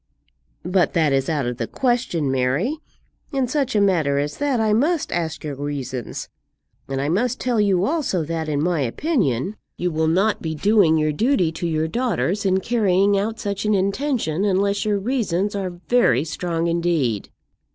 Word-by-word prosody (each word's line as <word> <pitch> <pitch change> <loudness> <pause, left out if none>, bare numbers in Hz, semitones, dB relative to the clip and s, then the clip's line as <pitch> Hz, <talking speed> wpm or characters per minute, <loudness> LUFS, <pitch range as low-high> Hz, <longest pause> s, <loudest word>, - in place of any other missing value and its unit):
"But 180 0 +2
that 155 -5 +2
is 135 +2 +1
out 150 -5 0
of 120 0 -3
the - - -3
question, 240 - 0
Mary. 135 - 0 0.6
In 270 -3 0
such 270 -1 -1
a - - +4
matter 165 -8 +2
as 145 +1 -2
that 285 -4 0
I 215 -1 +2
must 305 +7 +1
ask 165 -2 -2
your 150 -2 -4
reasons; 135 -4 -5 0.6
and 135 0 -3
I 140 - -1
must 230 - 0
tell 240 -4 +1
you 195 -2 +2
also 280 - 0
that, 160 0 -3
in 145 0 0
my 175 -1 +1
opinion, 180 - -1 0.2
you 180 0 -1
will 160 0 0
not 195 +7 +2
be 160 -1 -3
doing 195 -2 +4
your 155 0 +1
duty 215 - +1
to 165 +2 -3
your 160 -1 0
daughters 205 -2 -1
in 190 0 +2
carrying 200 -3 +2
out 220 +3 -1
such 200 -2 -3
an 210 -1 +2
intention, 200 - 0
unless 200 +1 +1
your 210 -1 +1
reasons 205 -4 -1
are 195 -2 -2
very 175 - +2
strong 165 +1 -2
indeed." 165 - 0
185 Hz, 175 wpm, -22 LUFS, 155-220 Hz, 0.6 s, a